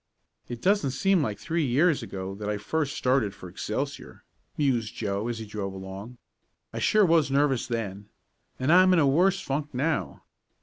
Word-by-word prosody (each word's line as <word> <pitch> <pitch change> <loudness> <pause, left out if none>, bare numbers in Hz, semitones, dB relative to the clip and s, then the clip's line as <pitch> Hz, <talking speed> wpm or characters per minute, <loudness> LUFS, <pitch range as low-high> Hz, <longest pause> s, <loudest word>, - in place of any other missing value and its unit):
"It 120 -1 -7
doesn't 195 -7 +3
seem 195 +2 +3
like 105 -7 -2
three 165 0 -1
years 145 +5 +2
ago 95 0 -6
that 105 +1 -5
I 105 - -1
first 145 +7 -2
started 125 -6 +1
for 90 - -10
Excelsior," 120 +10 -5 0.3
mused 120 -7 0
Joe, 100 0 -2
as 120 -1 -3
he 110 - -6
drove 100 -2 -5
along. 95 +5 -8 0.6
"I - - -4
sure 215 -1 +4
was 165 -4 +3
nervous 135 -2 +1
then, 105 -4 -4 0.5
and 135 +5 +2
I'm 185 +1 +6
in - - +4
a 150 - +4
worse 180 +8 +3
funk 145 0 -3
now. 150 +5 -1
130 Hz, 175 wpm, -27 LUFS, 105-155 Hz, 0.6 s, I'm